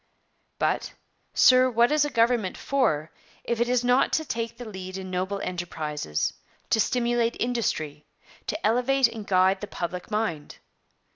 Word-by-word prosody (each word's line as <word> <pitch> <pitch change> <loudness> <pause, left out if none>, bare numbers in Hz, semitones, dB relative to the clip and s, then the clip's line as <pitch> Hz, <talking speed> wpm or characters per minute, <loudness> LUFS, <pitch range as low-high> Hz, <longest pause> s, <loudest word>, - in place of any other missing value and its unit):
But, - - -1 0.4
sir, 255 0 +6
what 235 +1 +3
is 300 -1 +3
a - - -2
government 230 -6 +1
for, 160 - 0 0.3
if 235 -1 -1
it 240 - +1
is 250 -1 +2
not 250 +2 +3
to 315 - +1
take 230 -3 -4
the 245 - -8
lead 190 -3 -7
in 190 -1 -7
noble 190 +2 -2
enterprises; 155 - -3 0.4
to 220 - +3
stimulate 240 0 +1
industry; 155 -12 -2 0.4
to 320 - -3
elevate 250 +3 +3
and 225 -3 -8
guide 190 +1 +3
the 205 - -5
public 180 0 -5
mind? 210 -9 -2
225 Hz, 150 wpm, -26 LUFS, 185-245 Hz, 0.4 s, sir